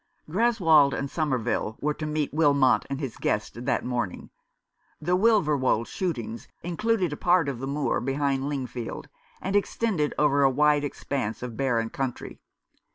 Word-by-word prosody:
Greswold 165 -7 +4
and 140 - -3
Somerville 125 -7 -1
were 150 +1 0
to 155 +1 -5
meet 150 -1 -2
Wilmot 140 -4 +3
and 140 0 -3
his 135 -6 -5
guest 115 +3 -2
that 130 - 0
morning. 120 -7 -3 0.7
The 175 +4 +1
Wilverwold 150 - +3
shootings 120 - -4 0.2
included 180 0 0
a - - -5
part 175 -3 +3
of 135 -4 -3
the 135 - -4
moor 140 +1 0
behind 135 +1 -1
Lingfield, 130 -4 -5 0.3
and 195 +1 -1
extended 200 -6 0
over 145 -1 +3
a 135 - +6
wide 150 +2 +3
expanse 135 -5 -3
of 120 -2 -5
barren 115 -4 0
country. 130 -3 -4
140 Hz, 150 wpm, -26 LUFS, 130-160 Hz, 0.7 s, a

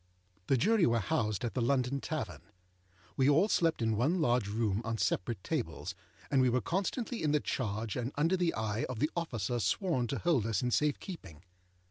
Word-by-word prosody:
The 135 - +3
Jury 210 - +4
were 115 0 +2
housed 110 - 0
at 115 - -3
the 130 - -1
London 130 +2 +1
Tavern. 85 - -4 0.7
We 135 +1 +3
all 160 +8 +5
slept 165 - +1
in 110 -1 +1
one 145 - +1
large 120 -8 +2
room 105 -1 0
on 115 0 -2
separate 105 0 -1
tables, - - -3 0.4
and 135 - +4
we 130 - +4
were 125 +1 +2
constantly 210 - -2
in 150 -1 +1
the 150 - +4
charge 110 -5 -2
and 125 +1 -2
under 165 +6 +2
the 175 -2 0
eye 110 0 -1
of 130 - -5
the 150 +7 0
officer 120 - -2
sworn 130 - 0
to 135 - -2
hold 150 -11 +1
us 110 0 0
in 125 - 0
safe 150 +3 +2
keeping. 95 - -9
125 Hz, 195 wpm, -32 LUFS, 110-160 Hz, 0.7 s, all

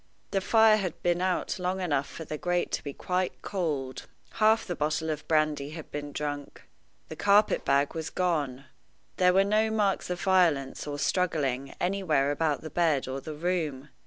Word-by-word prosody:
The 195 - +1
fire 220 +1 +5
had 185 -6 -3
been 175 0 +1
out 185 0 -1
long 180 +1 -1
enough 145 -6 0
for 160 - -8
the 150 0 -5
grate 175 0 0
to - - -2
be 145 - -4
quite 180 +5 -2
cold. 150 -9 -3 0.3
Half 220 +1 +4
the 175 - -3
bottle 155 +1 -1
of 150 -1 -6
brandy 155 -2 +1
had 160 - -10
been 145 0 -5
drunk. 145 -1 -5 0.5
The - - -6
carpet 205 +1 +3
bag 140 +1 +2
was 160 -1 -4
gone. 150 -7 -1 0.5
There 180 -1 +5
were 190 +2 +4
no 215 +2 +2
marks 205 -4 0
of 180 -1 -2
violence 165 -9 +2
or 145 0 -3
struggling 140 -7 -1
anywhere 175 -7 +1
about 150 0 0
the 155 - -8
bed 160 -6 +1
or 135 +1 -4
the 155 +1 -7
room. 155 -4 -2
160 Hz, 180 wpm, -28 LUFS, 145-185 Hz, 0.5 s, fire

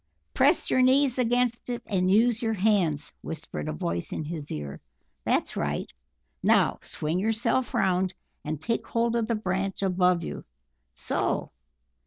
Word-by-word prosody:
"Press - - +3
your 255 - +4
knees 260 0 +4
against 245 0 +1
it, 240 -1 -3
and 185 -3 +1
use 225 +4 +4
your 225 -2 0
hands," 180 -8 +1
whispered 110 - -6
a - - -1
voice 85 +3 -2
in 155 - -3
his 155 -2 -5
ear. 75 -2 -5 0.4
"That's - - +1
right, - - -2 0.5
now - - +3
swing 155 +4 -2
yourself 225 +4 +1
round 185 0 +1 0.3
and 155 -1 -3
take 230 +8 -2
hold 235 0 +1
of 230 -2 +1
the 230 - +1
branch 195 -1 -2
above 180 -2 +2
you. - - -6 0.5
So! - - -1
195 Hz, 150 wpm, -27 LUFS, 160-235 Hz, 0.5 s, your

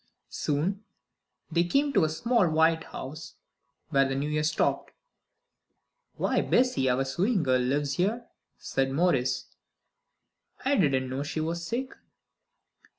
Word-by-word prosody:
Soon 175 +8 -1 0.7
they 170 +1 +3
came 275 +10 +1
to 195 - +4
a 155 - +2
small 230 +3 +1
white 160 +1 +2
house, 155 +4 -8 0.6
where 135 0 +4
the 135 - -1
New 140 +2 -2
Year 150 0 +1
stopped. 155 +1 0 1.3
"Why, - - +1
Bessie, 245 - +2
our 130 +2 +1
sewing 185 - 0
girl 130 -2 +2
lives, 140 +2 0
here," 220 +7 0 0.3
said 135 0 -1
Maurice. 135 -5 +1 1.2
"I 280 +2 +3
didn't 135 - +2
know 130 +2 -3
she 150 +2 -3
was 165 +2 -2
sick." 250 +9 -3
155 Hz, 130 wpm, -28 LUFS, 135-190 Hz, 1.3 s, to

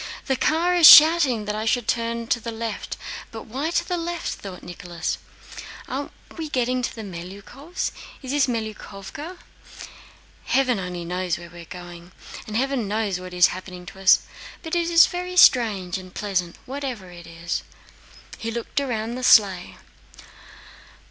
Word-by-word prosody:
"Zakhár 320 +6 +1
is 340 -3 +9
shouting 295 -8 +8
that 210 - -2
I 215 +1 -3
should 235 0 0
turn 230 0 -1
to 240 - +2
the 230 - -6
left, 225 -1 -5 0.3
but 225 - -9
why 270 +8 -3
to 345 - -1
the 360 - -1
left?" 345 0 -3
thought 190 -3 -10
Nicholas. 175 -1 -5 0.7
"Are 275 +2 -4 0.3
we 320 -2 -5
getting 255 -1 0
to 245 - -3
the 225 - -7
Melyukóvs'? 200 - -6 0.3
Is 260 - -5
this 285 -1 +2
Melyukóvka? 225 - -6 1.1
Heaven 255 -5 +2
only 180 -2 -5
knows 180 0 -2
where 170 0 -11
we 175 -1 -11
are - - -11
going, 175 0 -11 0.3
and 215 0 -3
heaven 265 -3 -1
knows 205 -3 -1
what 185 0 -9
is 180 -1 +5
happening 180 -1 -9
to 190 - -11
us—but 320 - +1
it 340 -1 +1
is 335 0 +7
very 360 0 -5
strange 200 - +4
and 185 0 -13
pleasant 180 -4 -2
whatever 255 -9 -6
it 175 -1 -12
is." 165 +1 -4 0.7
And - - -13
he 225 - -3
looked 235 +5 -3
round 230 -5 -2
in - - -5
the 255 - -6
sleigh. 195 -7 +4
225 Hz, 160 wpm, -23 LUFS, 185-270 Hz, 1.1 s, is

